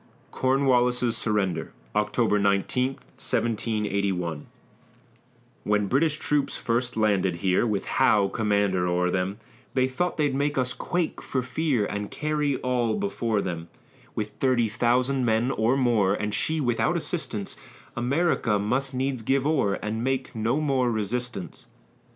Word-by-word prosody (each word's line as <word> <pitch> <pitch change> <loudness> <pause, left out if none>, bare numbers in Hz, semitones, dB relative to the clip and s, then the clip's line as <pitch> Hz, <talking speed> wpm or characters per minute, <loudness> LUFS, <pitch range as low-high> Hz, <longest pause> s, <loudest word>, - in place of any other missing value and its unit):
CORNWALLIS'S 125 -2 +2
SURRENDER 105 -5 -1 0.2
[October 105 - +2
19, 100 +6 +1 0.2
1781] 100 -7 -1 1.2
When 105 0 +1
British 150 +8 +2
troops 145 -2 0
first 120 +1 -1
landed 100 -5 +2
here, 95 +6 +1
With 105 -3 -1
Howe 105 -6 +3
commander 100 -3 +1
o'er 90 0 +1
them, 95 +2 -1 0.4
They 130 -1 +3
thought 175 +8 -2
they'd 145 -3 +1
make 145 +1 0
us 125 -1 +1
quake 175 -2 -2
for 130 -2 -2
fear, 130 -5 0
And 105 0 -4
carry 150 -2 -1
all 125 -3 +1
before 120 - -1
them; 85 -3 -4 0.5
With 105 -1 -2
thirty 125 0 +1
thousand 125 +4 +1
men 115 +2 +2
or 115 +4 +2
more, 110 -7 +3
And 105 0 -3
she 160 +7 0
without 120 -5 +1
assistance, - - -3 0.4
America 125 -3 +1
must 130 +6 -1
needs 130 -1 -1
give 135 +4 +1
o'er, 135 -10 +2
And 110 +2 -3
make 135 0 -1
no 115 +6 0
more 135 -5 +1
resistance. 115 -1 -3
120 Hz, 135 wpm, -26 LUFS, 105-135 Hz, 1.2 s, Howe